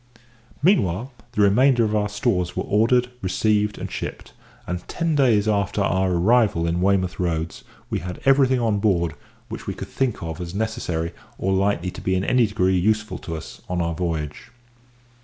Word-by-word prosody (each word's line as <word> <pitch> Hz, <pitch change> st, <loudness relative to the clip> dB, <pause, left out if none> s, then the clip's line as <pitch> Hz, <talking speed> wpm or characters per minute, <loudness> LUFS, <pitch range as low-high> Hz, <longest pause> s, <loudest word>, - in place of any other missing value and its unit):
Meantime, 125 Hz, -, +2 dB, 0.2 s
the 105 Hz, -3 st, +3 dB
remainder 120 Hz, +5 st, +4 dB
of 110 Hz, -1 st, 0 dB
our 105 Hz, 0 st, +1 dB
stores 105 Hz, -5 st, -1 dB
were -, -, -1 dB
ordered, 120 Hz, +4 st, +2 dB
received, 105 Hz, +2 st, +1 dB
and -, -, -6 dB
shipped, -, -, -6 dB, 0.3 s
and 90 Hz, 0 st, -5 dB
ten 165 Hz, -2 st, -1 dB
days 120 Hz, -8 st, +3 dB
after 100 Hz, -1 st, 0 dB
our 95 Hz, -1 st, +1 dB
arrival 100 Hz, -1 st, +3 dB
in 85 Hz, +1 st, 0 dB
Weymouth 95 Hz, -1 st, +1 dB
Roads 85 Hz, -2 st, -2 dB, 0.3 s
we -, -, 0 dB
had 90 Hz, 0 st, -6 dB
everything 135 Hz, -2 st, +4 dB
on 110 Hz, -4 st, +1 dB
board 85 Hz, -6 st, +1 dB, 0.3 s
which -, -, -8 dB
we -, -, -3 dB
could -, -, -7 dB
think 125 Hz, -8 st, -1 dB
of 80 Hz, +2 st, -5 dB
as 85 Hz, +1 st, -6 dB
necessary 100 Hz, -7 st, -2 dB, 0.3 s
or 95 Hz, -, 0 dB
likely 95 Hz, -2 st, +1 dB
to -, -, -9 dB
be 95 Hz, -, 0 dB
in 95 Hz, -, 0 dB
any 125 Hz, +1 st, +3 dB
degree 95 Hz, -3 st, +1 dB
useful 110 Hz, +3 st, 0 dB
to 85 Hz, -4 st, -6 dB
us 80 Hz, -, -9 dB
on 90 Hz, -1 st, -1 dB
our 85 Hz, -1 st, 0 dB
voyage. 80 Hz, -4 st, -4 dB
100 Hz, 175 wpm, -23 LUFS, 90-110 Hz, 0.3 s, remainder